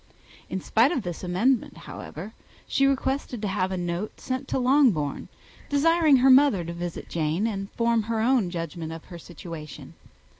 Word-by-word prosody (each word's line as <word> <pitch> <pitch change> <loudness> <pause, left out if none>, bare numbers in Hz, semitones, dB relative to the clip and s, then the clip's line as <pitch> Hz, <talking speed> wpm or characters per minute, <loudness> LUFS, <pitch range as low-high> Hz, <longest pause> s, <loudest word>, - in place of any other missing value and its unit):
In 190 - -3
spite 230 +9 +3
of 270 -10 -1
this 175 0 -6
amendment, 210 +8 +1
however, 190 +8 -8 0.3
she 275 - +2
requested 265 -2 -1
to - - 0
have 190 -1 -1
a 190 - -2
note 175 +3 -4
sent 260 +1 -4
to - - -1
Longbourn, 250 - +2 0.4
desiring 310 0 +4
her 260 +2 +5
mother 260 -9 +5
to 170 - -5
visit 170 0 -6
Jane, 165 +5 -1
and 195 -3 -3
form 230 -1 +2
her 225 -1 0
own 230 -4 +2
judgment 165 -1 -5
of 165 0 -8
her 175 -2 -10
situation. 165 -2 -9
205 Hz, 165 wpm, -26 LUFS, 175-260 Hz, 0.4 s, her